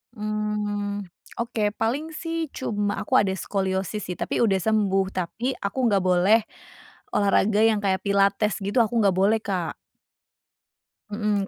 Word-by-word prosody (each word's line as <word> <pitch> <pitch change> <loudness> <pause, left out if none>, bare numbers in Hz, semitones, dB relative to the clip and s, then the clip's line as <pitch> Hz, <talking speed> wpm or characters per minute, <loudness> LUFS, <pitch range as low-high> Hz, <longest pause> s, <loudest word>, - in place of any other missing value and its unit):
Mmm, 210 -1 -2 0.4
oke, 230 -2 -1
paling 280 +9 -2
sih 330 -1 -3
cuma 205 -4 -2
aku 260 -3 +3
ada 195 -2 +1
skoliosis 190 +1 -2
sih 180 - -4
tapi - - -2
udah 215 -5 +3
sembuh. 200 -2 +2
Tapi 200 +8 -2
aku 200 +5 -4
nggak 200 -3 +2
boleh 185 +4 +4 0.8
olahraga 205 +1 +3
yang 220 -2 +4
kayak 190 -1 0
pilates 200 +1 +2
gitu 205 +5 0
aku 225 +2 -3
nggak 195 -2 +3
boleh, 205 +4 +3
Kak. 180 -5 -2 1.3
Mhm, 210 -2 -1
205 Hz, 135 wpm, -24 LUFS, 195-220 Hz, 1.3 s, boleh